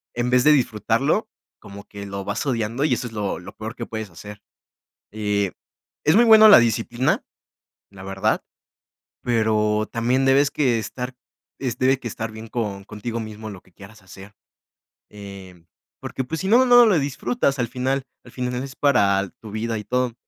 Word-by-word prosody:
en 120 +1 -1
vez 125 0 +4
de 150 - +6
disfrutarlo 120 -7 +1 0.3
como 100 +1 -11
que 100 -1 -9
lo 100 0 -6
vas 100 +7 -3
odiando. 120 +1 -1
Y 145 -5 +2
eso 120 - -2
es 115 - -12
lo 105 -3 -2
lo 90 - -12
peor 110 +1 -7
que 115 - -6
puedes 110 -2 -6
hacer. 105 +5 -11 0.7
Eh, 105 -2 -1 0.5
es 155 - +4
muy 240 - +6
buena 220 -1 +8
la 205 - +10
disciplina, 120 - 0 0.7
la 95 -1 -12
verdad, 95 0 -1 0.8
pero 110 -2 +1
también 125 +3 +1
debes 140 +2 +4
que 125 -6 +1
estar 125 +4 -5 0.5
es 125 -3 -2
debe 130 +1 +3
que 125 - -11
estar 110 +1 -5
bien 110 +1 -9
con 105 -5 -4
contigo 110 +3 -6
mismo 110 0 -8
en 100 - -7
lo 90 - -12
que 90 - -26
quieras 100 +2 -15
hacer. 95 +3 -13 0.8
Eh, 100 -4 -11 0.4
porque, 130 - -4
pues, 160 +4 -5
si 190 - -3
no, 245 +4 +6
no 245 -1 +7
lo 190 -7 +4
disfrutas 140 - -1
al 120 -2 -1
final 130 +2 -2 0.2
al 125 - -14
final 125 -1 -3
es 135 0 -8
para 100 -8 +2
tu 110 - -10
vida 110 +1 -3
y 105 - -7
todo, 125 -2 -1
115 Hz, 185 wpm, -22 LUFS, 105-130 Hz, 0.8 s, la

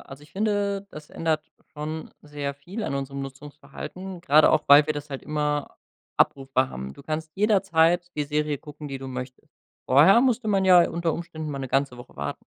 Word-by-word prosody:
also 135 +1 -11
ich 150 - -17
finde, 200 -1 -1
das 150 -4 -11
ändert 155 -1 -2 0.2
schon 155 +1 -6
sehr 145 -1 -5
viel 175 +11 -7
an 140 - -2
unserem 140 0 -4
Nutzungsverhalten, 145 +7 -9
gerade 155 -2 +5
auch, 155 - +2
weil 145 +1 +8
wir - - +1
das 145 0 -7
halt 135 -2 -6
immer 150 -1 -2 0.4
abrufbar 135 -1 +2
haben. 65 - -7
Du - - -14
kannst 155 +1 -4
jederzeit 175 -4 +2
die 150 - -1
Serie 150 0 -1
gucken, 150 +1 -10
die 135 -1 -5
du 135 0 -7
möchtest. 125 0 -8 0.4
Vorher 155 - +7
musste 245 -3 +1
man 195 -2 +2
ja 180 -2 +7
unter 170 -1 -1
Umständen 160 -2 -6
mal 140 - -4
'ne 135 -1 -5
ganze 135 -1 0
Woche 120 0 -13
warten. 70 0 -5
150 Hz, 190 wpm, -25 LUFS, 140-175 Hz, 0.4 s, weil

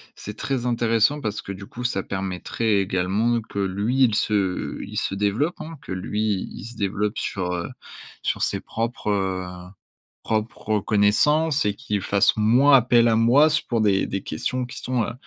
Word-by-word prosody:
c'est 105 - -8
très 130 -1 -2
intéressant. 120 +3 +2
Parce 105 -5 -3
que 100 - -6
du 100 +1 -9
coup 125 +4 -8
ça 100 -6 0
permettrait 100 +3 -1
également 100 +5 +1
que 105 - -11
lui, 100 +7 +1
il 115 -4 +3
se 100 -4 -1
il - - -7
se - - -1
développe 105 - 0
hein, 165 0 -8
que - - -6
lui 105 +3 -2 0.3
il - - -9
se 120 +1 -9
développe 105 +1 -1
sur, 90 -2 -2
heu, 85 -1 -3 0.5
sur - - -2
ses - - 0
propres, 115 -1 -4
heu, 90 -2 -3 0.5
propres 110 -1 -1
connaissances 140 +10 +2
et 105 - +1
qu'il 105 0 -2
fasse 100 +3 +2
moins 120 +7 +5
appel 120 -2 +5
à 110 - +3
moi 120 +7 +5
s 155 -1 +2
pour 115 -5 -2
des 100 -2 +2
des 95 - -4
questions 125 +11 -3
qui 125 - -10
sont, 125 -2 -1
heu, 110 - -3
105 Hz, 180 wpm, -23 LUFS, 100-120 Hz, 0.5 s, moins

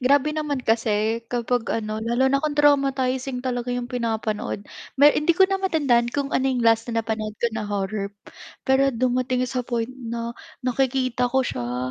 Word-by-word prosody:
Grabe 280 +3 +3
naman 300 -3 -2
kasi 225 0 0
kapag 240 0 -1
ano, 215 -1 -3
lalo 240 +4 +1
na 275 - +3
kung 300 0 -2
traumatizing 270 -3 +2
talaga 245 -1 -2
'yung 245 -1 -4
pinapanood. 220 -4 -2 0.3
Me 285 +2 +7
hindi 315 +3 +2
ko 380 - +4
na 390 - +1
matandaan 290 -11 +2
kung 280 -1 -1
ano 265 - +1
'yung 255 -2 0
last 225 0 +3
na 230 -1 -1
napanood 215 -1 -3
ko 235 - 0
na 220 -1 -4
horror, 200 0 -3 0.5
pero 270 0 +3
dumating 255 +1 0
sa 250 -1 -2
point 235 -1 -2
na 235 -2 -5 0.3
nakikita 255 -1 +1
ko 265 +2 +2
siya, 125 - -3
245 Hz, 170 wpm, -23 LUFS, 225-265 Hz, 0.5 s, Me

